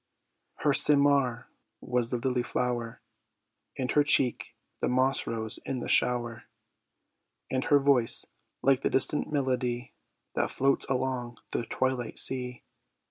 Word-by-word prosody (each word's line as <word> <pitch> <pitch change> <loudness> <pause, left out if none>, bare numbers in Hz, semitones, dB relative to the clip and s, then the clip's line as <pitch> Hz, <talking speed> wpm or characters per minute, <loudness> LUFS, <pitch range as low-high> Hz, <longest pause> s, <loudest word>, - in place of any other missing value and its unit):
Her 150 - +3
seymar 140 -5 +4 0.3
was 125 -2 -1
the 125 - -1
lily 125 +1 -1
flower, 120 -2 -3 0.7
And 130 -1 -2
her 145 - +3
cheek 135 -3 +2 0.2
the - - -1
moss 130 +2 +1
rose 110 -1 -3
in 130 - -4
the - - -6
shower; 120 -3 0 1.1
And 130 0 -1
her 145 - +4
voice 135 -4 +3 0.4
like 135 -1 +3
the - - -1
distant 140 +3 +2
melody 125 -3 -2 0.4
That - - -1
floats 135 +1 0
along 125 -2 -2
the 115 - -3
twilight 130 -3 -2
sea. 125 -2 -1
125 Hz, 130 wpm, -28 LUFS, 120-135 Hz, 1.1 s, seymar